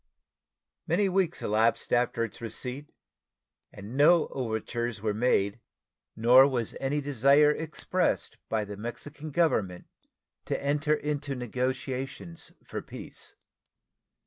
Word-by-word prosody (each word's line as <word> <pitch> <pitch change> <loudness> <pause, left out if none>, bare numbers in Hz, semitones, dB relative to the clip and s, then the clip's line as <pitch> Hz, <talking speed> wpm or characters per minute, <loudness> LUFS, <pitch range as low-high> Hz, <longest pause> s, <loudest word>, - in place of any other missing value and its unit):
Many 195 +4 +2
weeks 185 -2 0
elapsed 110 +2 +1
after 120 -1 +2
its 115 - -6
receipt, 125 +5 -6 0.8
and 100 +5 -9
no 155 +4 +5
overtures 120 -1 -3
were 105 0 -1
made 105 -2 +1 0.6
nor 125 +4 +7
was 120 -5 -2
any 140 +2 -1
desire 140 +2 +4
expressed 155 -1 -1
by 110 -2 0
the 100 0 -8
Mexican 145 +7 -7
Government 110 - +1 0.6
to - - -2
enter 150 +2 +1
into 145 -2 -3
negotiations 130 - -4
for - - -6
peace. - - -9
130 Hz, 110 wpm, -28 LUFS, 115-150 Hz, 0.8 s, nor